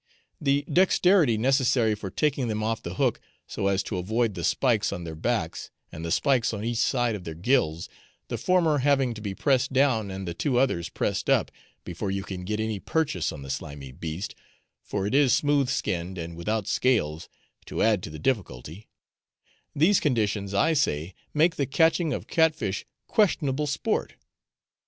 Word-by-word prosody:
The 140 -1 +2
dexterity 180 - +4
necessary 125 -2 +2
for 105 -2 -5
taking 140 +3 0
them 110 -1 -2
off 115 +1 -1
the 85 +2 -6
hook - - +1 0.2
so 100 - -2
as 100 -1 +1
to 95 - -3
avoid 110 +4 0
the 85 -3 -6
spikes 115 -1 +2
on 85 - -5
their 80 -1 -6
backs, 85 -1 -2 0.2
and 80 - -8
the 85 - -3
spikes 125 - +2
on 105 +1 -5
each 115 -1 -1
side 120 -3 +1
of 100 -4 -6
their 80 -2 -6
gills, 85 - +1 0.4
the - - -4
former 170 -5 +2
having 135 -2 +2
to 110 - -9
be 100 -2 -4
pressed 130 0 +1
down, 130 -6 +2
and 95 -1 -6
the 85 - -3
two 125 - 0
others 125 -10 +1
pressed - - -2
up, - - +3 0.3
before 90 +4 -4
you 95 0 -2
can 90 -2 -6
get 105 +2 -2
any 110 -2 -2
purchase 115 - -1
on 70 - -8
the 70 - -5
slimy 70 -1 -6
beast 80 +6 -5 0.5
(for 100 -2 -3
it 105 - -2
is 140 -4 +4
smooth 145 -3 +2
skinned 90 -7 -2
and 85 0 -6
without 105 +5 -2
scales, 80 -14 0 0.4
to - - -1
add 110 -4 +3
to - - -7
the 75 - -8
difficulty) 90 - -3 0.9
these 175 +7 +4
conditions, 105 -7 0
I 160 +12 +3
say, 85 - 0 0.2
make 165 +3 +2
the 140 - 0
catching 160 +3 +2
of - - -3
cat 160 -1 +3
fish 100 -9 -4 0.2
questionable 150 -8 +1
sport. 140 - -1
110 Hz, 180 wpm, -26 LUFS, 90-140 Hz, 0.9 s, dexterity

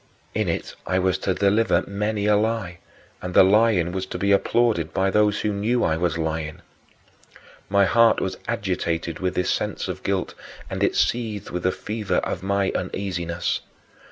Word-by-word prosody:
In - - 0
it - - -3
I 95 - +1
was 95 0 +1
to 95 -1 -1
deliver 100 -2 +2
many 105 +1 -2
a 105 0 +4
lie, 105 -5 -1 0.4
and 90 0 -5
the - - +9
lying 100 -3 +3
was 95 0 -3
to - - -5
be 100 0 +1
applauded 100 -5 +2
by 95 0 +2
those 105 0 +2
who 105 - 0
knew 110 +5 0
I 80 - +2
was 85 0 0
lying. 80 -1 -3 1.1
My 100 0 +4
heart 115 +3 +4
was 95 - -3
agitated 90 -7 -2
with 90 -1 -1
this 90 - +1
sense - - -2
of - - -5
guilt - - -1 0.4
and - - -3
it - - +2
seethed 110 -4 -1
with 90 - -3
the 90 - +2
fever 105 0 -3
of - - -1
my 100 0 0
uneasiness. 85 -2 -2
95 Hz, 175 wpm, -23 LUFS, 90-105 Hz, 1.1 s, the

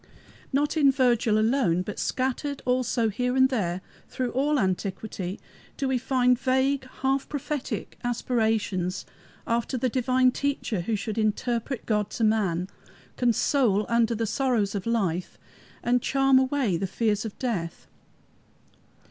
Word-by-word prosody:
Not 290 +3 +1
in 280 -3 +6
Virgil 240 -5 +2
alone, 215 -6 +2
but 205 +2 -6
scattered 265 +2 -2
also 250 -2 +1
here 250 +4 -1
and 260 0 +5
there 190 -8 -1 0.3
through 255 -2 -2
all 290 +3 +1
antiquity, 190 -1 -2 0.4
do 275 - -1
we 260 -1 +1
find 250 -1 +2
vague, 265 +1 +1 0.2
half 270 +1 0
prophetic 290 -1 -4
aspirations 220 -6 -1 0.4
after 235 +3 -1
the 255 +1 0
divine 255 +1 +3
Teacher 270 -8 -2
who 220 +6 -1
should 210 +2 -3
interpret 230 +3 -1
God 210 -2 0
to 230 - -1
man, 195 -5 +1 0.5
console 235 -3 +2
under 235 0 +2
the 225 +1 -1
sorrows 225 -3 0
of 200 +1 -4
life, 185 -7 -1 0.5
and 245 +1 +2
charm 270 0 +4
away 260 -8 +1
the 195 - -2
fears 210 +1 0
of 220 -2 -7
death. 195 -11 -3
235 Hz, 135 wpm, -26 LUFS, 210-260 Hz, 0.5 s, in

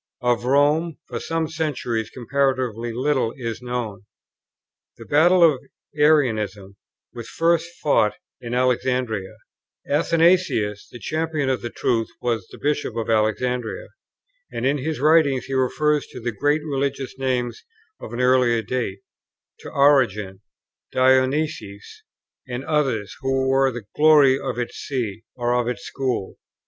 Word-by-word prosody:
Of 120 -1 +1
Rome 145 +4 +2
for 120 - -5
some 165 +3 -2
centuries 145 -8 -2
comparatively 130 -3 -1
little 130 -1 0
is 115 -3 -5
known. 120 -6 -4 0.9
The - - -11
battle 175 +5 +4
of 155 -6 +5 0.4
Arianism 110 -10 +1 0.4
was 120 -1 -8
first 170 0 +1
fought 110 -8 +3 0.3
in 120 0 -4
Alexandria; 125 -5 0 0.5
Athanasius, 165 - +2
the - - -9
champion 155 0 -2
of 130 -5 0
the 120 - -4
truth, 115 -1 0
was 115 -6 -2 0.2
Bishop 145 0 -1
of 115 -1 -2
Alexandria; 115 +2 -1 0.6
and 120 - -3
in 140 +2 +1
his 155 +2 -3
writings 150 -3 +3
he 135 - -6
refers 150 +3 +1
to - - -10
the 120 0 -3
great 145 +7 0
religious 140 -2 -2
names 125 -2 -2 0.4
of - - -9
an 120 +1 -3
earlier 125 -3 +3
date, 115 -7 -3 0.6
to - - -9
Origen, 105 -9 +2 0.5
Dionysius, 130 - 0 0.5
and 125 +1 -5
others, 130 -9 -1
who 135 0 0
were 135 0 +3
the 120 -4 -8
glory 150 -3 +6
of - - -4
its 120 -1 -4
see, 115 -5 -4
or 120 -1 0
of 125 -1 +1
its 125 - -3
school. 125 -8 -3
130 Hz, 135 wpm, -22 LUFS, 115-145 Hz, 0.9 s, glory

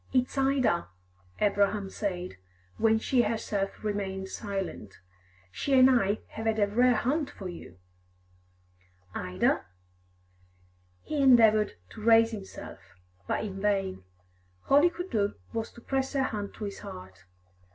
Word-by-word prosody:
"It's 255 -1 +1
Ida," 265 -9 +2 0.5
Abraham 205 0 +2
said, 180 - -4 0.4
when 220 0 +4
she 245 +3 +2
herself 210 -3 -2
remained 190 -2 -3
silent. 195 - -5 0.5
"She 270 - +1
and 260 +1 +7
I 210 -4 +2
have 220 +1 -5
had 220 0 +1
a 205 - +4
rare 245 +4 +3
hunt 280 +7 0
for 190 - -8
you." 170 - -10 1.4
"Ida?" 90 0 0 1.4
He 300 -2 -2
endeavoured 225 -5 +5 0.2
to 215 - -10
raise 225 0 +6
himself, 205 -4 -8 0.5
but - - -1
in 195 -2 -5
vain. 195 - 0 0.7
All 280 +1 +7
he 350 - +5
could 355 +2 -7
do 205 -2 0 0.2
was 225 -1 -2
to 235 - -14
press 270 +2 -2
her 270 -1 +2
hand 210 -5 -4
to - - -7
his 200 -1 -5
heart. 95 +1 -10
215 Hz, 135 wpm, -28 LUFS, 195-250 Hz, 1.4 s, and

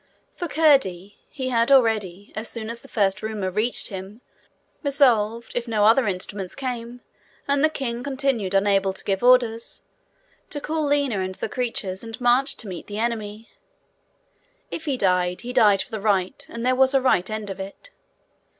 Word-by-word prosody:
For 350 - -4
Curdie, 265 - +2
he 260 -3 -4
had 235 +1 +2
already, 215 -7 +2
as 220 +1 -3
soon 230 -1 -5
as 235 - -7
the - - -14
first 200 -2 0
rumour 215 -4 -3
reached 215 +5 +1
him, 195 +3 -8 0.6
resolved, 235 -6 +2
if 240 0 -2
no 215 -2 +2
other 225 +2 +5
instructions 190 0 -3
came, 245 -2 -5 0.5
and 280 0 +2
the 310 - +5
king 245 -6 -4
continued 265 -8 -1
unable 195 -1 +2
to 190 - -9
give 195 -1 -1
orders, 240 -2 +3 0.7
to 290 - -4
call 310 +1 -2
Lina 285 -7 +1
and 185 0 -3
the - - -3
creatures, 230 -6 -3
and 225 -1 -8
march 245 +3 +2
to 225 - -8
meet 180 -3 -7
the 205 - -6
enemy. 220 -1 -3 1.2
If 325 - -5
he 280 -4 -1
died, 180 -3 +1
he 245 +1 -6
died 205 -4 +4
for - - -19
the 220 -2 -4
right, 195 -3 0
and 235 +1 -5
there 255 - +3
was 265 +1 +3
a - - +6
right 210 -8 +2
end 215 -2 -4
of 195 - -8
it. 195 - -8
225 Hz, 175 wpm, -23 LUFS, 200-255 Hz, 1.2 s, a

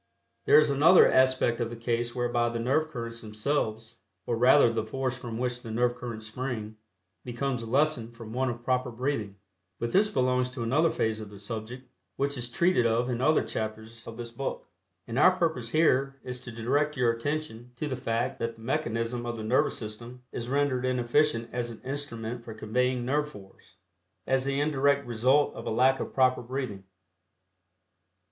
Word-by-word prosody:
There - - +7
is 150 -1 +5
another 160 +6 +7
aspect 130 -2 +3
of 120 -1 -1
the 120 - -6
case 120 +1 -2
whereby 120 -1 +1
the 115 - -3
nerve 135 +7 +1
currents 115 -4 -6
themselves, 110 0 -2 0.3
or 120 - 0
rather 125 0 +5
the 115 - -1
force 130 +3 -2
from 120 -3 -6
which 125 0 -2
the 115 - -9
nerve 120 +2 +1
currents 115 -3 -7
spring, 110 -2 -5 0.5
becomes 125 -1 -3
lessened 130 -3 +1
from 115 -1 -9
want 130 +1 0
of 120 0 -6
proper 125 0 0
breathing, 120 -4 -3 0.4
but 115 0 -3
this 210 +2 +4
belongs 125 -3 +1
to 125 -2 -5
another 150 +8 +3
phase 110 -6 -1
of 105 - -8
the 100 - -12
subject 115 +5 -7 0.3
which 140 +1 -1
is 120 -2 -3
treated 125 -2 +3
of 120 +2 +1
in 120 0 -2
other 155 +4 +4
chapters 110 0 -6
of 115 - -8
this 120 -1 -7
book, 135 +3 -4 0.4
and 120 +2 -2
our 185 +4 +7
purpose 160 -10 0
here 135 -2 +2
is 125 0 -6
to 120 -1 -8
direct 140 +6 0
your 125 -2 +3
attention 120 -1 -4
to 150 - -3
the 135 - -2
fact 120 -1 -2
that 115 0 -2
the 115 - -16
mechanism 120 -3 -2
of 120 - -3
the 110 - -6
nervous 120 +4 +2
system 120 +3 -8
is 120 0 -5
rendered 140 -2 +1
inefficient 125 0 +1
as 120 -1 -2
an 115 - -9
instrument 125 -4 -5
for 110 -2 -8
conveying 125 +3 0
nerve 150 +3 0
force, 95 -6 -15 0.5
as 130 0 +1
the 140 0 0
indirect 140 -1 +2
result 125 +5 +2
of - - -8
a - - 0
lack 130 +4 +3
of - - -4
proper 130 -1 +3
breathing. 120 -6 -5
120 Hz, 185 wpm, -28 LUFS, 115-135 Hz, 0.5 s, There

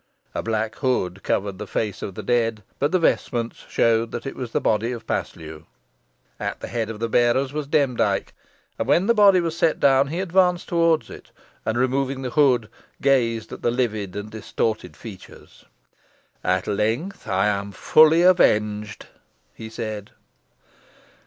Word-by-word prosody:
A - - -2
black 110 0 -2
hood 100 -8 -1
covered 100 -1 -2
the 105 - -6
face 105 -2 -3
of 95 - -6
the - - -6
dead, 115 -3 0 0.2
but 145 +2 +1
the 185 - +3
vestments 120 -8 -1
showed 115 0 +2
that 120 - -6
it 135 - -5
was 125 -3 -6
the - - +1
body 110 +2 0
of 120 -2 -7
Paslew. 80 -1 -5 0.7
At - - -4
the - - -6
head 115 -2 -2
of 110 -2 -6
the 115 - -1
bearers 120 +4 +2
was 150 -2 -3
Demdike, 125 -9 +1 0.5
and 115 - -1
when 170 +7 +3
the 235 - +4
body 200 -4 +6
was 165 -2 -2
set 165 -2 +1
down 135 0 +4
he 165 +5 -4
advanced 180 -1 +2
towards 165 -2 +1
it, - - -12 0.4
and, 110 +1 0
removing 130 +1 0
the 125 - -3
hood, 125 -6 +3 0.3
gazed 115 -5 +1
at - - -9
the - - +1
livid 110 -6 -2
and 105 +1 -6
distorted 110 -5 -3
features. 105 -6 -13 0.8
"At 90 0 +1
length 110 - -2
I 95 +1 +1
am 100 -1 -1
fully 155 - +5
avenged," 105 - +2 0.5
he 110 - -9
said. 110 -3 -6
115 Hz, 165 wpm, -23 LUFS, 105-140 Hz, 0.8 s, body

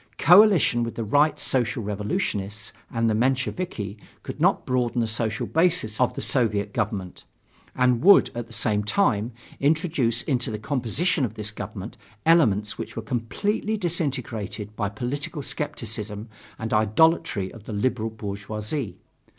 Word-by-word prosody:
Coalition 180 - +6
with 115 -1 -3
the 115 - -3
Right 145 +8 +3
Social 120 -2 0
Revolutionists 105 - -3 0.2
and 115 -1 0
the 110 - +2
Mensheviki 125 - -1 0.2
could - - -7
not - - +3
broaden 125 -1 0
the 115 - +2
social 110 0 -1
basis 165 -10 +1
of 125 - +2
the - - -3
Soviet 105 -5 0
government; 100 -5 -3 0.5
and 125 -2 +2
would, 200 +2 +7
at 120 -1 -5
the - - -18
same 105 -1 0
time, 115 - +1 0.3
introduce 145 -6 +1
into 130 -2 -1
the 110 - -3
composition 140 - 0
of 110 -3 -2
this 110 0 -2
government 105 +2 -7 0.3
elements 110 - +3
which - - -6
were 115 - -4
completely 200 - -1
disintegrated 130 - -3
by 105 -3 -1
political 140 - -4
skepticism 110 -6 -4 0.3
and 110 -1 -4
idolatry 110 - +2
of 110 -3 -13
the 110 - -6
liberal 115 +1 0
bourgeoisie. 105 - -4
115 Hz, 140 wpm, -25 LUFS, 105-140 Hz, 0.5 s, would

